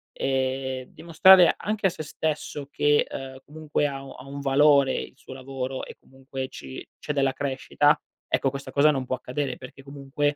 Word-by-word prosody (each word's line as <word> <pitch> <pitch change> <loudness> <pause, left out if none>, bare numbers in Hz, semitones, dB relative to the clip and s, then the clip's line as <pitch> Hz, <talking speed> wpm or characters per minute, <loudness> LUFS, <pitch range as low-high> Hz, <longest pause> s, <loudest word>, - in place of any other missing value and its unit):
e 130 -1 -2
dimostrare 175 +2 +6
anche 210 -1 0
a - - +1
se 155 - -7
stesso 150 -1 -4
che, 145 0 +3
uhm, 130 -1 -7
comunque 150 -1 -2
ha 135 -1 -6
u 135 - -10
ha 130 - -12
un 140 +1 -6
valore 140 -1 +4
il - - -5
suo 140 -2 -11
lavoro 130 0 -5
e - - -11
comunque 135 0 -7
ci 65 -1 -9
c'è 150 - -3
della 135 -2 +1
crescita, 140 +2 +1 0.3
ecco 135 - +1
questa 140 0 -7
cosa 150 +2 +5
non 135 -3 -2
può 130 - 0
accadere 130 +2 -3
perché 130 +1 -12
comunque, 145 +1 -2
140 Hz, 180 wpm, -25 LUFS, 130-145 Hz, 0.3 s, dimostrare